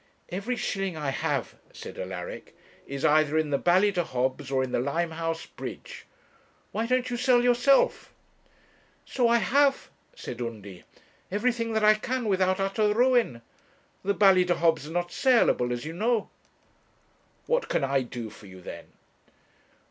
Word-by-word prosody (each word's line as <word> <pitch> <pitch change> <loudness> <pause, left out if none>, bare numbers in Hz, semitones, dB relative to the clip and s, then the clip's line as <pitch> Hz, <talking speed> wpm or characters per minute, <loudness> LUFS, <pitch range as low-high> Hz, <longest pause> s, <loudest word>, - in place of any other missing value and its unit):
'Every 200 +8 -3
shilling 195 -7 -3
I 145 -3 -2
have,' - - -2 0.2
said - - -10
Alaric, - - -7 0.3
'is 140 0 -3
either 155 0 +3
in 155 -2 0
the 140 - +1
Ballydehobs 175 -8 +1
or 135 -1 +1
in 130 - -4
the - - 0
Limehouse 165 +4 -2
Bridge. - - -9 0.6
Why 225 +2 -2
don't 255 0 0
you 240 - -2
sell 250 -1 +3
yourself?' 245 +3 +3 0.9
'So 245 -3 +1
I 235 0 +4
have,' 275 +4 +2 0.2
said 120 0 -7
Undy; 105 -6 -7 0.4
'everything 230 +3 -1
that 220 -1 0
I 215 0 +7
can 245 +3 -3
without 185 -2 +1
utter 200 +2 +1
ruin. 235 - +2 0.6
The 200 +1 0
Ballydehobs 175 -6 +3
are - - -8
not 175 +1 -2
saleable, 235 - +3
as 120 +3 -4
you 160 - -5
know.' 225 +4 0 1.1
'What - - 0
can - - 0
I 135 0 +1
do 120 -3 -7
for 105 - -14
you, 95 -1 -12
then?' 90 - -10
185 Hz, 145 wpm, -27 LUFS, 140-235 Hz, 1.1 s, I